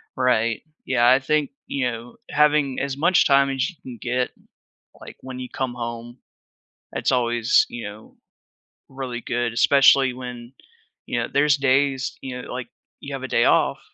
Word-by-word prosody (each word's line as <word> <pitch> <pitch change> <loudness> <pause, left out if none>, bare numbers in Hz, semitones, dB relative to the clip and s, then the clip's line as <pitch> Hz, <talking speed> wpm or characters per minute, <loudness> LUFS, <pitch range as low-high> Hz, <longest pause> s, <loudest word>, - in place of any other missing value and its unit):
Right. 115 -3 +1 0.2
Yeah, 120 -2 +2
I 130 +2 +6
think, 150 +1 0 0.2
you 130 -3 -1
know, 115 +1 -8
having 150 -3 +2
as 140 0 -3
much 175 +4 +4
time 140 -1 +4
as 135 +5 -1
you 180 - -13
can 125 -3 -9
get, 125 0 -1 0.7
like, - - -11
when 130 -1 -8
you 125 - -6
come 130 -2 -3
home, 120 0 -6 0.7
it's - - 0
always, 120 -1 +3
you 120 - -6
know, 105 +2 -10 0.7
really 130 -3 -5
good, 120 -1 -2
especially 135 0 +5
when, 125 0 -9 0.5
you - - -2
know, - - -2
there's 145 0 +3
days 135 0 +1
you 125 -1 -6
know, - - -10
like, 125 -1 -5 0.3
you 140 0 -7
have 135 -1 -5
a - - -3
day 120 - +2
off, - - +3
130 Hz, 170 wpm, -23 LUFS, 120-140 Hz, 0.7 s, I